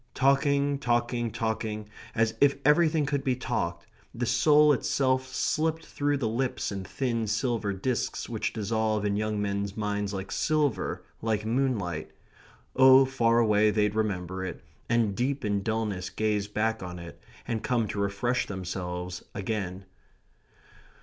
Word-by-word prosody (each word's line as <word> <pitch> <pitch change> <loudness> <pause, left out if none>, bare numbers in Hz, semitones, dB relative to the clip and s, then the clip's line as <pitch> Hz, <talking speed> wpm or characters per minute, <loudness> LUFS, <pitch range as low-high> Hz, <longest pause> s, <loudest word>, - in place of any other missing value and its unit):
Talking, 140 +1 +2
talking, 120 -2 0
talking 110 -1 -3 0.3
as 110 -1 +2
if 140 -1 +5
everything 155 0 +4
could 140 -1 -1
be 130 -3 +1
talked 85 -8 -3 0.3
the 120 +1 -1
soul 150 +6 +5
itself 130 0 +1
slipped 160 +5 -1
through 145 0 -1
the 125 -5 -1
lips 120 +2 -1
in 100 -1 -4
thin 115 +2 -2
silver 110 -1 0
disks 110 +5 -2
which - - -2
dissolve 110 -1 -1
in 100 -1 +1
young 105 0 -1
men's 100 0 -2
minds 105 -1 -1
like 95 -1 -5
silver, 150 -5 0 0.2
like 110 -1 -1
moonlight. 100 - -1 0.6
Oh, 130 0 +8
far 120 -3 +2
away 105 -2 +4
they'd 105 -1 +1
remember 95 -4 -2
it, 95 - -6 0.3
and 115 -4 +2
deep 130 +3 -1
in 100 -1 0
dulness 105 -4 -2
gaze 105 -2 -1
back 110 +2 -1
on 90 -1 -6
it, 85 -1 -10 0.3
and 115 -2 -2
come 120 -3 0
to 105 - -3
refresh 100 +6 0
themselves 90 -1 -5
again. 95 -2 -3
110 Hz, 145 wpm, -28 LUFS, 100-130 Hz, 0.6 s, Oh